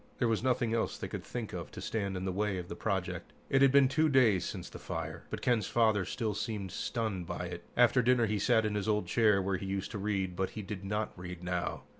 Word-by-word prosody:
There 120 - +2
was 115 -1 +1
nothing 120 -2 +1
else 115 - 0
they - - -4
could - - -6
think - - -5
of - - -5
to - - -7
stand 100 -4 -2
in 90 - -4
the 95 - 0
way 100 +1 0
of 90 -1 -6
the - - -5
project. - - -2 0.2
It 135 - +4
had 135 -1 +7
been 140 -1 +6
two 155 +4 +2
days 120 - +4
since - - -5
the - - -10
fire, - - -5
but - - -5
Ken's 120 -4 +2
father 110 -4 +3
still 110 +2 -2
seemed 100 -3 -3
stunned 100 -3 -2
by 90 - -3
it. - - -6
After 125 +1 +5
dinner, 125 -1 +4
he 105 -1 0
sat 110 +1 +3
in 105 - 0
his 105 +1 -1
old 105 -3 +2
chair 105 +1 +3
where 95 0 0
he 95 - -6
used 95 0 -3
to 105 - -4
read, 95 -3 -1
but 95 +1 -1
he 105 - -3
did 100 0 -6
not 105 +2 -2
read 90 -1 -8
now. 90 0 -2
105 Hz, 255 wpm, -32 LUFS, 95-115 Hz, 0.2 s, had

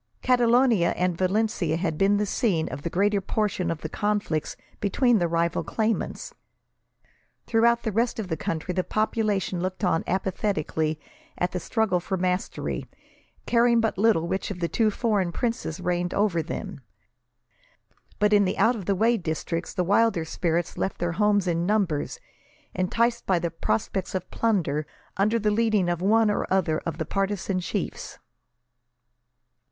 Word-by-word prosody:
Catalonia 240 -5 +3
and 180 -1 +1
Valencia 185 -3 0
had 165 -3 -1
been 195 +5 +3
the 210 - +1
scene 195 -7 0
of 130 +2 -6
the 170 - -3
greater 200 +3 +1
portion 190 -3 -1
of 165 -2 -3
the - - -3
conflicts 205 -4 -1 0.2
between 235 +3 +2
the 175 - +1
rival 170 0 0
claimants. 220 0 -2 1.1
Throughout 235 +1 +3
the 220 - -1
rest 230 +4 0
of 220 -4 -3
the 165 - -2
country 160 +3 -3
the 185 0 0
population 215 -4 0
looked 185 +3 -4
on 165 -3 +2
apathetically 170 -5 -1 0.4
at 180 - 0
the 180 - -2
struggle 205 -1 0
for 190 +2 -3
mastery, 180 +1 -2 0.6
caring 235 0 +4
but 225 -1 0
little 200 -5 +2
which 190 +2 -2
of 195 -3 -5
the 170 - 0
two 220 +5 +2
foreign 205 -5 0
princes 230 -7 -2
reigned 175 0 -1
over 200 -5 +2
them; 160 - -6 1.4
but, 210 0 +3
in 205 -1 +6
the 185 0 -1
out 230 +4 +4
of 200 -5 -6
the 200 - +1
way 230 +5 +3
districts, 165 -1 -3
the 180 - -1
wilder 200 -2 +2
spirits 170 +1 -2
left 190 - -1
their 175 0 -1
homes 205 +1 +2
in 170 0 0
numbers, 200 - 0 0.5
enticed 235 +6 0
by 185 - +3
the 170 0 -2
prospects 165 - -2
of 185 -1 -4
plunder, 160 -10 0 0.3
under 210 +4 +2
the 215 -1 +1
leading 215 -4 +2
of 175 0 -1
one 215 +2 +4
or 205 - -2
other 170 -5 +2
of 165 - -3
the 160 - -2
partisan 195 0 -1
chiefs. 180 - -4
190 Hz, 160 wpm, -25 LUFS, 170-215 Hz, 1.4 s, in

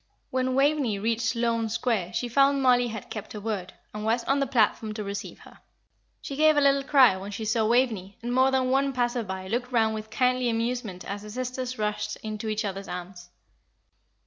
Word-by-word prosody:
When 255 0 0
Waveney 275 -6 +2
reached 225 +2 0
Sloane 230 -1 0
Square 210 -5 -1
she 245 - -1
found 275 +2 +3
Mollie 245 -1 +4
had 220 -3 -7
kept 215 -1 -6
her 210 - -5
word, 200 -4 -4 0.2
and 210 0 -5
was 230 +2 +1
on 275 +3 +1
the 275 - +1
platform 220 -3 +1
to 215 - -4
receive 200 +1 -6
her. - - -16 0.6
She 275 - -5
gave 310 +1 +4
a - - +5
little 275 0 +4
cry 270 -6 +5
when 195 +2 -7
she 205 +2 -5
saw 220 0 +1
Waveney, 225 -5 +1
and 240 +1 -2
more 260 +1 +4
than 260 -1 +1
one 275 +1 +2
passer 245 -1 0
by 190 -3 -6
looked 245 +5 -2
round 220 -2 +2
with 215 0 -6
kindly 250 +2 +1
amusement 230 -5 -2
as 200 +1 -5
the 210 - -10
sisters 255 +2 -4
rushed 210 0 -2
into 215 0 -4
each 215 0 -1
other's 195 0 -5
arms. 180 0 -8
230 Hz, 200 wpm, -26 LUFS, 210-255 Hz, 0.6 s, a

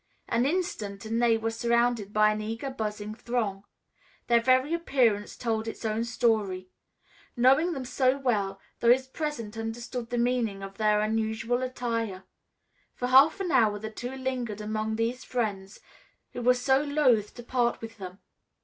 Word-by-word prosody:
An 235 +3 +1
instant 225 - -3
and 225 +2 -1
they 230 -1 +4
were 225 0 -2
surrounded 235 -2 +1
by 215 0 +4
an 215 0 -3
eager, 225 +5 -4
buzzing 210 -3 -4
throng. 215 -4 -3 0.6
Their 235 -1 +4
very 260 +5 +3
appearance 245 -11 +1
told 225 -2 -2
its 225 - -6
own 220 +1 0
story. 210 -6 0 0.7
Knowing 270 +8 +4
them 265 -4 -5
so 255 +1 +2
well, 205 -8 -1 0.2
those 245 +3 +4
present 260 -6 -5
understood 235 +1 -5
the 245 - -2
meaning 235 -5 0
of 195 0 -8
their 210 -1 +3
unusual 220 +3 0
attire. 230 -6 -3 0.7
For 250 - -2
half 280 +8 +6
an 360 -3 -2
hour 220 -6 +4
the 220 +1 -6
two 245 +4 -6
lingered 255 -5 -3
among 215 +1 -2
these 230 +3 -2
friends 205 -5 -3 0.5
who - - -5
were 250 +1 +4
so 265 +2 +2
loth 275 -8 +2
to 240 - -9
part 240 -1 0
with 225 -1 -9
them. 185 -1 -8
230 Hz, 160 wpm, -28 LUFS, 215-255 Hz, 0.7 s, half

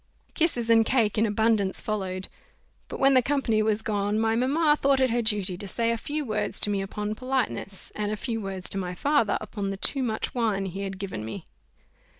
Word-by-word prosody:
Kisses 245 -8 +1
and 225 0 +6
cake 220 -4 +1
in 225 - +3
abundance 210 -2 +2
followed 190 -3 -3 0.6
but - - -7
when 270 0 +5
the 255 - +6
company 240 -5 +1
was 215 0 +1
gone, 205 -1 0
my 225 0 +2
mamma 295 +6 +3
thought 275 -2 +2
it 260 -2 +3
her 240 +1 +1
duty 205 -5 +1
to 200 +3 -8
say 230 +3 0
a - - +1
few 295 +6 -3
words 215 -3 0
to 205 - +4
me 200 -1 0
upon 210 +2 -3
politeness, 255 -5 -3
and 210 -1 -2
a - - -1
few 225 +1 -3
words 190 -2 -5
to 195 - +1
my 180 -1 -4
father 280 -3 +2
upon 200 -3 -4
the 195 - -4
too 270 +7 0
much 220 -4 -2
wine 215 -5 0
he 190 +1 -5
had 195 -1 -4
given 190 - -5
me. 160 - -7
215 Hz, 210 wpm, -26 LUFS, 200-245 Hz, 0.6 s, and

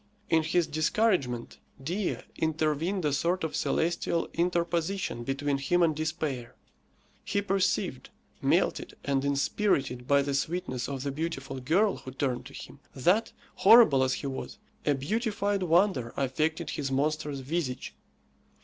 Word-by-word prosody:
In 160 - +5
his 165 +2 +1
discouragement 150 - 0 0.2
Dea 180 +6 -1 0.2
intervened 160 +3 0
a 145 - +1
sort 170 +6 0
of 160 - -2
celestial 170 0 0
interposition 170 -4 -1
between 135 +2 -1
him 175 +6 +2
and 160 -2 +2
despair. 155 -6 -3 0.7
He 200 - 0
perceived, 195 -1 0 0.3
melted - - +1
and 135 -1 +1
inspirited 140 - 0
by 140 -1 +4
the 140 0 -2
sweetness 140 -3 -2
of 135 -2 -4
the 140 - -2
beautiful 135 -3 -4
girl 180 +11 +2
who - - -9
turned 130 -1 -2
to 140 - -14
him, 140 - -10 0.2
that, 180 - +2 0.3
horrible 200 - +7
as 130 0 +1
he - - -6
was, 135 +8 -5 0.3
a 145 - +4
beautified 205 - -1
wonder 170 - +2
affected 155 +5 -1
his 140 -2 -3
monstrous 145 0 -1
visage. 130 -2 -3
155 Hz, 135 wpm, -29 LUFS, 135-175 Hz, 0.7 s, horrible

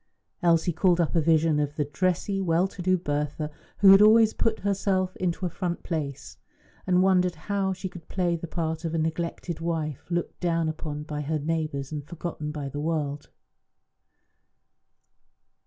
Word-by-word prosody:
Elsie 170 0 +3
called 180 +1 +3
up 170 0 +1
a 165 - +4
vision 160 -1 +3
of 145 0 -1
the 150 - 0
dressy, 185 +5 -1
well 175 0 +2
to 190 - -9
do 185 +1 +3
Bertha, 150 -1 -2 0.3
who 195 -1 +9
had 195 +1 +8
always 220 +1 +6
put 225 -1 0
herself 190 -2 0
into 180 0 -1
a - - +2
front 175 0 -3
place, 150 -5 -4 0.5
and 180 0 +4
wondered 180 -2 +3
how 195 +4 -1
she 190 0 -4
could 175 -3 -11
play 175 -2 0
the 170 +1 -6
part 160 0 -3
of 165 -1 -2
a - - +1
neglected 165 +1 -2
wife, 160 -4 -3
looked 175 -1 -2
down 165 -2 +1
upon 155 -1 -4
by 150 -1 -4
her 155 +2 -1
neighbours 155 -2 -2
and 150 -2 -4
forgotten 165 -3 -5
by 150 -2 -5
the 145 +2 -5
world? 150 -2 -2
165 Hz, 170 wpm, -26 LUFS, 155-185 Hz, 0.5 s, who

